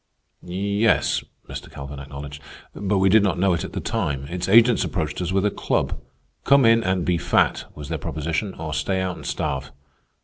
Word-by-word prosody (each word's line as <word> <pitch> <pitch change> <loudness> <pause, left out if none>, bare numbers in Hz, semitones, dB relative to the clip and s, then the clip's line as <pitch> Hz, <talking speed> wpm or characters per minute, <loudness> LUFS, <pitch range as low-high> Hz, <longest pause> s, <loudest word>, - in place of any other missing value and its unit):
"Yes," 100 +4 +1 0.2
Mr. - - -7
Calvin 70 0 -8
acknowledged. 70 +1 -8 0.3
"But 100 0 -1
we 95 0 +4
did 105 +3 +6
not 100 -3 +1
know 95 0 +3
it 85 - -1
at - - -7
the - - -2
time. 70 -1 -2
Its 90 +1 -3
agents 115 +3 +6
approached - - -2
us 90 0 -2
with 95 +1 +1
a 105 - +2
club. - - -1 0.4
"Come 140 -2 +5
in 115 0 +5
and 95 -2 0
be 90 -2 +1
fat," - - +2
was 75 -1 -8
their 80 -2 -2
proposition, 80 +7 -3
"or 80 -1 -5
stay 95 -1 0
out 95 -1 -2
and - - -9
starve." 70 0 -2
90 Hz, 195 wpm, -23 LUFS, 75-100 Hz, 0.4 s, did